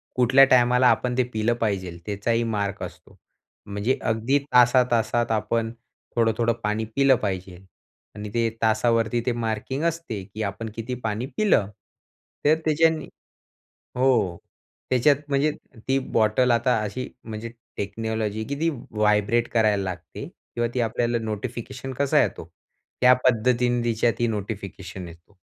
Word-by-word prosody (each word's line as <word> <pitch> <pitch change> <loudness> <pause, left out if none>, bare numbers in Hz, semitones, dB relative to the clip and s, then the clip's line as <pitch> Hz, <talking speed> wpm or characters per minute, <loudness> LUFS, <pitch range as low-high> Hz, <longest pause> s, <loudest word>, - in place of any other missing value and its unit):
कुठल्या 130 +2 +6
टायमाला 125 0 +5
आपण 125 +2 +1
ते 130 - +4
पिलं 110 +2 +1
पाहिजेल? 95 -6 -2
त्याचाही 115 +3 0
मार्क 105 -3 -2
असतो. - - -11 0.5
म्हणजे 100 +6 -1
अगदी 115 +5 +1 0.2
तासा-तासात 120 -2 +3
आपण 110 +1 0 0.4
थोडं-थोडं 115 0 +2
पाणी 105 +1 -1
पिलं 135 -1 +5
पाहिजे 95 -2 -3 0.6
आणि 105 0 -6
ते 115 -1 +1
तासावरती 115 +1 +2
ते 125 - +2
मार्किंग 115 +4 -3
असते, 165 - -2
की 105 +3 -6
आपण 105 +3 -4
किती 115 +2 -4
पाणी 110 +2 -2
पिलं. 195 - +3 0.8
तर 150 +2 +6
त्याच्याने 160 0 +2 0.9
हो 110 -10 +2 0.5
त्याच्यात 130 +3 +4
म्हणजे 140 +2 +2 0.4
ती 135 - +2 0.2
बॉटल 115 +3 +3
आता 120 0 +2
अशी 115 +5 -4 0.2
म्हणजे 110 +1 -6 0.3
टेक्नॉलॉजी 110 +1 -3
आहे 110 - -4
की 140 - -3
ती 165 - +3 0.2
व्हायब्रेट 105 +2 +2
करायला 105 -3 +3
लागते 90 -3 -6
किंवा 120 0 -4
ती 125 - -1
आपल्याला 120 +1 0
नोटिफिकेशन 120 +4 -5
कसा 140 +1 +3
येतो? - - -4 0.6
त्या 125 0 +8
पद्धतीने 120 0 +2
तिच्यात 115 0 +1
ही 120 - +2
नोटिफिकेशन 100 -3 -5
येतो. 85 +4 -16
115 Hz, 135 wpm, -24 LUFS, 105-125 Hz, 0.9 s, त्या